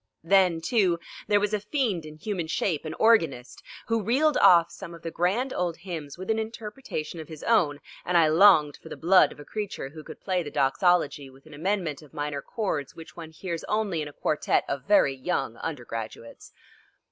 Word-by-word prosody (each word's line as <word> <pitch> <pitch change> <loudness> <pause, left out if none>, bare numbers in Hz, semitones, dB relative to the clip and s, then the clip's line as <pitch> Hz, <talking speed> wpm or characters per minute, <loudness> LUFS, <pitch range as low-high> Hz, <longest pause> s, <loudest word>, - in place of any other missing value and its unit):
Then, 180 -2 +3
too, 185 -4 +2 0.3
there 205 -1 +4
was 210 +1 -1
a 210 - +1
fiend 210 - -1
in 155 - -10
human 175 0 -4
shape, 160 -1 -1
an 155 - -5
organist, 165 - +2 0.2
who 230 -1 0
reeled 275 +9 +2
off 170 -1 +6
some 170 -3 -9
of 165 - -15
the 165 - -4
grand 210 +12 0
old 175 -2 -2
hymns 165 -6 -7
with 185 +4 -3
an 220 - 0
interpretation 220 - -6
of 155 - -8
his 155 -2 -10
own, 165 -11 +2 0.2
and 180 0 +1
I 165 -2 +5
longed 155 -3 +5
for - - -12
the - - -7
blood 170 -3 +5
of - - -13
a 145 - -10
creature 205 -9 -5
who 155 +2 -11
could - - -11
play 185 -2 -1
the 155 - -6
doxology 145 0 +1
with 135 +2 -19
an 155 - -14
amendment 165 -2 -2
of 150 - -17
minor 145 -1 -3
chords 160 - -3
which 165 - -12
one 165 -2 -8
hears 170 +1 -6
only 210 -6 -1
in 150 - -4
a - - -9
quartet 150 - 0
of 140 -1 -4
very 200 -8 +4
young 135 -4 -3
undergraduates. 115 -6 -7
170 Hz, 200 wpm, -26 LUFS, 150-205 Hz, 0.3 s, off